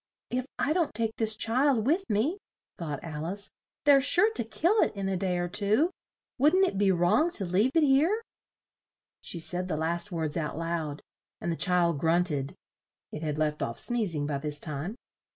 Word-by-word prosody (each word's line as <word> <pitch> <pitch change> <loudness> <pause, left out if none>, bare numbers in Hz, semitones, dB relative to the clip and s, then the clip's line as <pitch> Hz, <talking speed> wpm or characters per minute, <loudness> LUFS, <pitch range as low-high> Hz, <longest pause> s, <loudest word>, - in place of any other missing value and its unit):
"If 255 +1 -2
I 305 - +1
don't 335 -9 0
take 225 0 -1
this 220 -1 +2
child 240 0 +2
with 355 +8 +1
me," 275 - 0 0.4
thought 150 -5 -5
Al 155 -2 -5
ice, 200 +4 -2 0.3
"they're 280 -2 +7
sure 400 +10 +4
to 235 - 0
kill 345 - +1
it - - +1
in 195 -1 -3
a 195 - -1
day 180 -1 -1
or 175 0 -1
two; 215 - +2 0.5
wouldn't 320 +8 +5
it 195 - -3
be 200 -1 +4
wrong 180 - +3
to 200 - +1
leave 190 +8 +2
it 325 - +5
here?" 310 +11 +3 1.0
She - - -5
said 180 +2 -2
the 155 - -2
last 170 +5 -1
words 160 -3 -2
out 155 -2 -3
loud, 165 -3 -3 0.4
and 170 - -2
the - - -1
child 170 -4 +2
grunt 170 +2 +2
ed 140 -1 -3 0.6
(it 150 - -6
had 150 -2 -2
left 150 -1 -1
off 115 - -3
sneez 225 -8 +1
ing 145 -1 -1
by 145 -1 -2
this 150 0 -3
time). 155 +8 -4
190 Hz, 195 wpm, -28 LUFS, 165-260 Hz, 1.0 s, they're